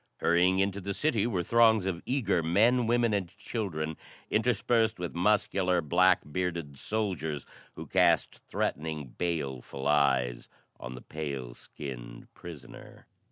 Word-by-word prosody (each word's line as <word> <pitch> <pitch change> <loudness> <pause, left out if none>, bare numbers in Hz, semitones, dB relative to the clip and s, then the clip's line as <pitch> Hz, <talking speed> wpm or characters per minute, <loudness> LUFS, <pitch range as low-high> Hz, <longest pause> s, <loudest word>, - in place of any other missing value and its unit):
Hurrying 90 +2 +3
into 100 +1 0
the 100 +1 -4
city 120 -8 +1
were 95 -7 -1
throngs 110 -1 +4
of 90 -3 -2
eager 110 -10 +1
men, 110 +9 +3
women 120 -1 +2
and 100 -3 0
children, 80 -9 -4 0.3
interspersed 115 0 +2
with 90 -1 -4
muscular, 90 -1 +2
black 90 +4 +3
bearded 85 -5 -3
soldiers 90 -9 -2 0.3
who - - -7
cast 90 -3 +2
threatening, 75 -3 -3
baleful 70 -4 -4
eyes 65 -5 +2 0.3
on 65 +1 -7
the 60 - -10
pale 70 -6 -5
skinned - - -9
prisoner. 85 -6 -11
90 Hz, 125 wpm, -29 LUFS, 75-105 Hz, 0.3 s, throngs